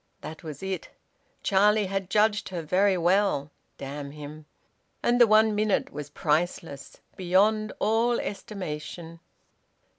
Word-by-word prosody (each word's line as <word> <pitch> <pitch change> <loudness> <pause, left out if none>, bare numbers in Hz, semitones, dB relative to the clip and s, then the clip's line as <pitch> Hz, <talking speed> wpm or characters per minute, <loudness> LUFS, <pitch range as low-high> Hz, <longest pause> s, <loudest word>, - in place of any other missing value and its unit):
That 160 - -8
was 155 +2 -8
it. 190 -3 -4 0.5
Charlie 210 +1 +3
had 195 -1 -3
judged 210 0 +2
her 175 -3 -5
very 190 +4 +2
well 175 -5 +1 0.3
damn 140 +1 -6
him! 150 +1 -10 0.6
And 245 +1 +3
the 240 - +8
one 215 0 +5
minute 210 -1 0
was 145 -1 -6
priceless, 150 -1 -2 0.2
beyond 205 +4 +2
all 230 +3 +2
estimation. 170 -4 -6
190 Hz, 120 wpm, -26 LUFS, 155-210 Hz, 0.6 s, the